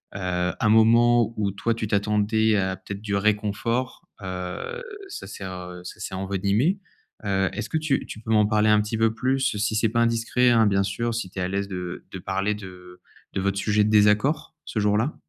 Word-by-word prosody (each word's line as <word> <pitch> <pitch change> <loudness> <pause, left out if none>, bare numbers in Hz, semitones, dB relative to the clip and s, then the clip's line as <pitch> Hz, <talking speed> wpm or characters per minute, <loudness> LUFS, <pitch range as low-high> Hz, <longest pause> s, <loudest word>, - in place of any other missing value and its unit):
heu, 90 -2 -1
un 110 - +2
moment 115 +1 +5
où 100 -2 0
toi 115 +4 -1
tu 110 -2 -3
t'attendais 105 +1 +2
à 95 -1 0
peut-être 100 +2 -8
du 100 -2 -2
réconfort, 110 +4 -1
heu, 95 - -5 0.3
ça 395 - -8
sert 95 -2 -7
heu, 90 0 -8
ça - - -9
s'est - - -5
envenimé. 100 - 0 0.5
Heu, 95 -1 +1
est-ce - - -4
que 160 - 0
tu 155 -3 0
tu 110 - -8
peux 110 - -4
m'en 105 -1 +5
parler 110 0 +2
un 105 0 +5
petit 105 +2 -3
peu 110 0 +2
plus, 130 0 0
si 110 +1 0
c'est 110 +1 +3
pas 115 +1 +1
indiscret, 115 +2 +2
hein, 115 -2 +5
bien 100 -1 +2
sûr, 115 +4 -2
si 105 -6 -3
tu 95 - -7
es - - -1
à 90 - 0
l'aise 100 +1 -2
de 90 -2 -5
de 95 - -6
parler 95 +3 -1
de 90 -3 -11 0.3
de - - -1
votre 100 0 0
sujet 105 +1 +2
de - - +1
désaccord, 105 +10 +3
ce 110 - -3
jour-là? 105 +7 +1
105 Hz, 210 wpm, -24 LUFS, 95-115 Hz, 0.5 s, moment